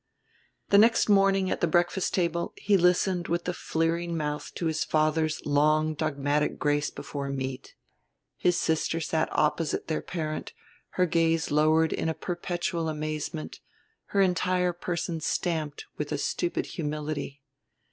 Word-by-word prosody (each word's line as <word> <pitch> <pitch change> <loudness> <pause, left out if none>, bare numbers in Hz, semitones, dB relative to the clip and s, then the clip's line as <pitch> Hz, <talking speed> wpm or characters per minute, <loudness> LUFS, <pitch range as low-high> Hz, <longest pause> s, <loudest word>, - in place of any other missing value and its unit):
The 200 - +6
next 225 0 +4
morning, 195 -1 +4
at - - -2
the 170 - +3
breakfast 175 +3 +1
table, 170 -2 0
he 205 - +2
listened 180 0 +2
with 170 +1 -1
a 180 - 0
fleering 165 +1 -1
mouth 150 -1 -3
to 170 - -3
his 160 -1 0
father's 155 0 +1
long 155 +2 +3
dogmatic 150 -1 0
grace 145 0 +1
before 140 -1 -6
meat. 130 -1 -5 0.6
His 175 -1 +2
sister 160 +1 0
sat 160 0 0
opposite 155 +1 0
their 155 - 0
parent, 155 -3 -4 0.4
her 180 - +4
gaze 165 -2 +1
lowered 155 +2 +3
in 160 - -1
a 160 - -2
perpetual 175 -1 -2
amazement, 150 - -4 0.5
her 200 - +1
entire 180 -1 +2
person 170 -1 -3
stamped 155 -3 -2
with 150 0 -3
a 150 - 0
stupid 170 +4 -1
humility. 150 -3 -4
160 Hz, 140 wpm, -27 LUFS, 150-175 Hz, 0.6 s, The